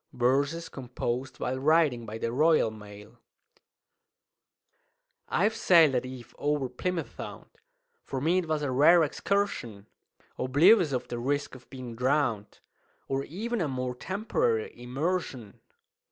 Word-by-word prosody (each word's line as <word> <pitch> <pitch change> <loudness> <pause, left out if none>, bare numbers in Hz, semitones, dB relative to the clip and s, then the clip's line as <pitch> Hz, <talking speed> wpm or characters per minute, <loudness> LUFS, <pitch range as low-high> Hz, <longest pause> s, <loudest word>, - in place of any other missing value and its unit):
Verses 140 +7 +1
composed 130 -1 -4
while 130 +1 -2
Riding 145 -5 +2
by 110 +1 -5
the 115 +1 -2
Royal 155 -3 +3
Mail. 105 +2 -13 2.1
"I've 210 +5 +2
sailed 165 -9 +5
at 125 0 -1
eve 125 -2 -10
o'er 145 -3 0
Plymouth 170 +7 -4
Sound - - -8 0.6
(For 135 - -4
me 165 +7 +2
it 175 - -4
was 155 -1 -1
a 140 - -1
rare 160 +6 +6
excursion) 145 - -2 0.5
Oblivious 160 - +5
of 125 -2 -2
the 120 - -4
risk 140 +3 -1
of 130 -2 -14
being 125 -3 -8
drown'd, 125 -4 0 0.5
Or 135 0 -2
even 220 +6 -3
of - - +1
a 140 - -3
more 125 0 -2
temporary 440 - -1
immersion. 130 - -3
135 Hz, 135 wpm, -28 LUFS, 125-165 Hz, 2.1 s, rare